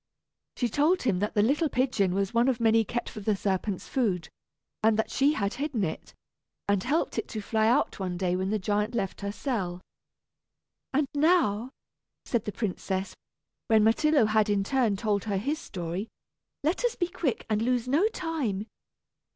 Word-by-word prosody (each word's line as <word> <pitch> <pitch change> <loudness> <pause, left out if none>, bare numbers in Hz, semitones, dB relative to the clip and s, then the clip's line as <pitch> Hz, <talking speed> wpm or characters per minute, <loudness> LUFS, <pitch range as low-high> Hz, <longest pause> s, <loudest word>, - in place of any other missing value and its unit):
She 245 - +1
told 300 - +2
him 205 -8 +1
that 210 +3 -2
the 205 - +4
little 295 +7 +2
pigeon 245 -8 +1
was 195 +2 0
one 235 +2 +3
of 255 -3 +1
many 225 -1 +4
kept 240 +2 -3
for 215 - -7
the 210 0 +1
serpent's 195 0 -2
food, 195 -10 0 0.5
and 220 0 +4
that 220 - 0
she 280 +3 +3
had 200 -7 -1
hidden 275 -5 -2
it, 160 - -5 0.5
and 200 -2 +2
helped 295 +6 0
it - - -4
to 220 - -5
fly 220 +1 +1
out 245 +1 +2
one 180 -2 -3
day 180 -1 0
when 190 +1 -1
the 215 - +1
giant 210 +3 -1
left 195 -4 -2
her 200 0 -2
cell. 200 -7 -3 1.1
"And 280 +1 +1
now," 285 - +3 0.6
said 235 -4 -1
the 210 - -2
princess, 195 -2 -3 0.5
when 220 -3 +5
Myrtillo 270 +4 +4
had 215 0 +2
in 200 -1 +2
turn 235 -3 +1
told 205 -2 0
her 205 -3 0
his 285 +10 -1
story, 180 - -5 0.6
"let 325 - 0
us 485 -1 +1
be 350 - 0
quick, 325 -7 -2
and 215 -1 0
lose 245 0 +1
no 305 +11 +3
time. 300 - -2
220 Hz, 180 wpm, -28 LUFS, 200-270 Hz, 1.1 s, when